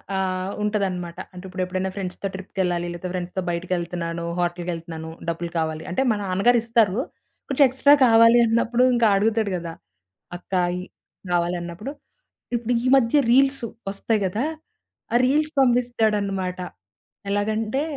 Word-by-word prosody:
ఆహ్, 185 0 -1
ఉంటదన్నమాట. 190 -5 -2 0.2
అంటే 180 0 -10
ఇప్పుడెప్పుడనా 185 0 -2
ఫ్రెండ్స్‌తో 195 0 -4
ట్రిప్‌కెళ్ళాలి 185 -2 -2
లేతే 175 +1 -6
ఫ్రెండ్స్‌తో 180 +1 -3
బయటికెళ్తున్నాను, 170 -1 -3 0.2
హోటల్‌కెళ్తున్నాను 170 -2 -3 0.2
డబ్బులు 170 +1 -2
కావాలి 160 -1 -2
అంటే 180 - 0
మా - - +1
నాన్నగారిస్తారు. 225 +1 +2 0.5
కొంచెం 280 +1 +3
ఎక్స్‌ట్రా 270 +3 +5
కావాలి 230 0 +6
అన్నప్పుడు 235 +2 +2
ఇంక 240 -1 +1
అడుగుతాడు 215 +1 +1
గదా! 170 -1 -6 0.6
"అక్క 175 - -26 0.3
ఈ" - - -5 0.5
కావాలన్నప్పుడు 175 +6 -2 0.6
ఇప్పుడు 240 +1 -1
ఈ - - -3
మధ్య 245 +2 +3
రీల్స్ 270 +1 +3 0.3
వస్తాయి 210 +2 -1
గదా. 205 +6 -1 0.7
ఆ - - +2
రీల్స్ 300 +4 +2
పంపిస్తాడన్నమాట. 215 -7 +1 0.7
ఎలాగంటే 215 +6 0
195 Hz, 115 wpm, -23 LUFS, 175-230 Hz, 0.7 s, కావాలి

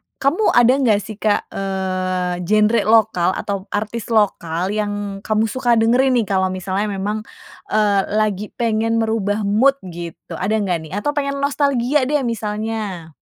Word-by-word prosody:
kamu 300 +10 0
ada 240 +1 +6
nggak 220 -6 +3
sih 215 -1 -9
Kak, 210 -1 0
eee, 185 -2 -2
genre 215 +2 +3
lokal 220 -6 +4
atau 200 -1 -4
artis 215 +2 -4
lokal 190 -5 0
yang 205 -1 -3
kamu 215 +1 +1
suka 240 +2 +1
dengerin 245 +4 +3
nih, 235 - +3
kalau 190 -1 +1
misalnya 185 +2 -2
memang, 205 +2 -3 0.5
eee, 205 -2 +2
lagi 210 -1 0
pengen 225 -1 0
merubah 220 -2 0
mood 220 +8 +3
gitu? 170 -2 -8
Ada 200 +4 0
nggak 180 -3 0
nih? - - -15
Atau 210 +9 -1
pengen 280 -1 -2
nostalgia 280 -1 +1
deh 290 -1 +1
misalnya? 210 -6 -4
215 Hz, 150 wpm, -19 LUFS, 195-230 Hz, 0.5 s, ada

